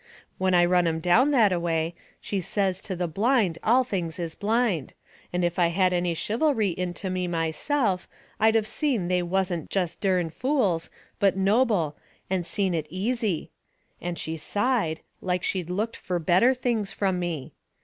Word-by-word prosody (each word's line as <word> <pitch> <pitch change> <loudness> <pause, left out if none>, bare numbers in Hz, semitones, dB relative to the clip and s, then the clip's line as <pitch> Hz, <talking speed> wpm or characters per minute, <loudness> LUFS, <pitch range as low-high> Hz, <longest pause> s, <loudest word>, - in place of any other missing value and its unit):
When 185 -1 +2
I 175 0 +6
run 180 -1 +3
'em 160 -1 0
down 180 - +4
that 225 -9 +4
a 175 - 0
way, 165 -1 -1 0.3
she 200 -2 -3
says 190 0 -1
to 190 - -4
the 175 0 -1
blind 200 - +1
all 250 +4 +4
things 175 -9 -3
is 170 -2 -4
blind, 215 - 0 0.4
and 180 0 0
if 175 +1 -1
I 175 - +5
had 180 +2 +2
any 175 -1 0
chivalry 225 - +1
into 180 +2 -3
me 185 -1 -1
myself 180 - 0 0.3
I'd 220 +1 +4
of 220 -1 +3
seen 235 - -1
they 180 0 +2
wasn't 175 -2 -1
jest 180 -4 -2
dern 180 -4 +1
fools, 215 - 0 0.3
but 195 -1 +3
noble, 195 - +2 0.4
and 180 -2 0
seen 195 -3 0
it 160 -3 -2
easy. 205 0 -1 0.5
And 175 0 -3
she 160 0 -4
sighed, 205 -1 0 0.2
like 180 -1 -1
she'd 180 -3 -1
looked 215 +5 -2
fur 180 - -2
better 185 +10 +4
things 230 -5 -1
from 190 -3 0
me. 170 -6 -4
185 Hz, 170 wpm, -26 LUFS, 175-215 Hz, 0.5 s, I